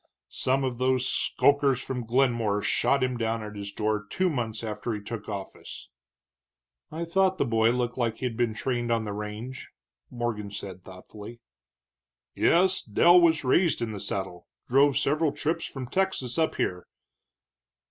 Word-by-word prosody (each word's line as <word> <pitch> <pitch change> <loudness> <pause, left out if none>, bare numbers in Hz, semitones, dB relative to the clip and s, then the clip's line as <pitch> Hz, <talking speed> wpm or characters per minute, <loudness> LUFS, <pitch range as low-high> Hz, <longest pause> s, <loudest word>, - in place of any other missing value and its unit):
Some 135 +1 0
of 125 -2 -2
those 130 0 +2
skulkers 140 -2 +2
from 125 -2 -4
Glenmore 115 -5 +1
shot 140 -1 +2
him 130 -1 -1
down 115 -1 -1
at 105 0 -8
his 100 0 -6
door 105 0 -1
two 185 -1 +1
months 115 -5 -3
after 110 +1 -3
he - - -5
took 105 +1 -7
office." 100 -2 -8 1.0
"I 165 +2 -4
thought 190 +2 +2
the - - +1
boy 115 -1 +3
looked 120 +1 -1
like 115 -2 0
he'd 125 -1 -3
been 115 -2 0
trained 120 -1 -2
on 115 -1 +1
the 105 - -4
range," 105 +5 -6 0.4
Morgan 120 -4 -3
said, 95 -2 -8
thoughtfully. 105 +5 -11 0.9
"Yes, 185 +2 +3
Dell 175 - +5
was 160 -3 +3
raised 165 +6 +3
in 115 -2 -2
the 105 - -6
saddle, 95 -2 -4 0.2
drove 140 +2 +4
several 150 +1 +1
trips 165 +2 -2
from 135 -2 -6
Texas 165 -4 -1
up 160 - +1
here. 90 -1 -2
120 Hz, 160 wpm, -27 LUFS, 110-140 Hz, 1.0 s, Dell